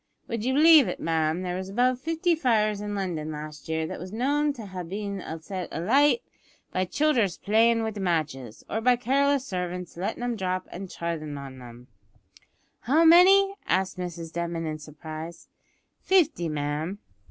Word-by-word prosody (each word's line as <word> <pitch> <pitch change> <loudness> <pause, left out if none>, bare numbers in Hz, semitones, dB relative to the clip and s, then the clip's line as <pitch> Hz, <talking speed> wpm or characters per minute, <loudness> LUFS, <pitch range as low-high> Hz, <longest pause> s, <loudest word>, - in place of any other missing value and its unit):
Would 230 -2 -3
you 260 +2 0
believe 310 -2 +7
it, - - -4
ma'am, 160 +1 0
there 180 -1 -3
was 190 +1 -5
above 250 +4 +1
fifty 330 +4 0
fires 215 -9 +1
in 205 0 -4
London 170 -6 -3
last 150 0 -8
year 160 0 -1
that - - -6
was 185 +1 -8
known 285 +6 +1
to 230 -5 -9
ha' 185 -2 -6
bin 200 +2 -5 0.2
set 185 +1 -5
alight 275 - +3 0.5
by 185 0 0
childers 230 - +1
playin' 225 +2 +3
wid 220 -1 -3
matches, 155 - -2
or 220 - -2
by 250 +2 +4
careless 275 +2 +1
servants 180 -4 -4
lettin' 195 +6 -3
'em 245 -1 -1
drop 185 -2 -2
an' 190 +2 -7
treadin' 160 -4 -4
on 135 -2 -9
'em?" 120 0 -12 0.9
"How 305 +8 +3
many?" 385 +4 +7
asked 185 +1 0
Mrs 170 -2 -6
Denman 170 -1 -3
in 155 -1 -4
surprise. 155 +2 -9 0.5
"Fifty, 325 - +2
ma'am." 150 +5 -3
190 Hz, 165 wpm, -26 LUFS, 165-245 Hz, 0.9 s, believe